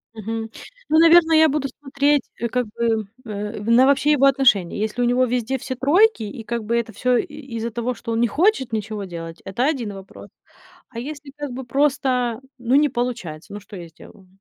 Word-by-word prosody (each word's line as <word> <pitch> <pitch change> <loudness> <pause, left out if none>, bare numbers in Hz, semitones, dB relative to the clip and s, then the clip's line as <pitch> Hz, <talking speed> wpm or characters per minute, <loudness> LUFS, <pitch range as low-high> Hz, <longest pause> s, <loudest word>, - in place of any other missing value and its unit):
Мгм. 225 +1 -5 0.4
Ну, 315 - +4
наверно, 330 0 +6
я 315 0 +6
буду 280 -1 -1
смотреть, 280 +1 0 0.2
э, 235 - -1
как 245 0 -1
бы, 225 -1 -1 0.2
э, 210 0 -5
в 210 - -5
на 240 +3 +6
вообще 280 +2 +3
его 275 -2 +4
отношение. 245 -11 +3
Если 215 +3 -2
у 245 - +3
него 250 +1 +3
везде 250 +1 -1
все 260 +1 -5
тройки, 315 - +3
и, 215 +2 -7
как 235 -1 -3
бы 235 +3 0
это 225 -2 -3
всё 250 +3 +1
и - - 0 0.3
из-за 225 +1 -3
того, 240 +2 -3
что 230 -1 -6
он 225 - 0
не 240 - +3
хочет 320 - +1
ничего 215 -1 -3
делать, 165 -2 -8
это 215 +7 -2
один 245 -9 -1
вопрос. 195 0 -12 0.6
А 230 -2 -7
если, 285 +1 -8
как 290 -2 -5
бы, 255 +1 -6
просто, 255 -3 0 0.2
ну, 245 +1 0
не 295 +1 +5
получается, 210 -9 -4
ну, 205 - -6
что 205 - -13
я 170 -3 -9
сделаю? 185 +4 -17
240 Hz, 210 wpm, -22 LUFS, 220-275 Hz, 0.6 s, наверно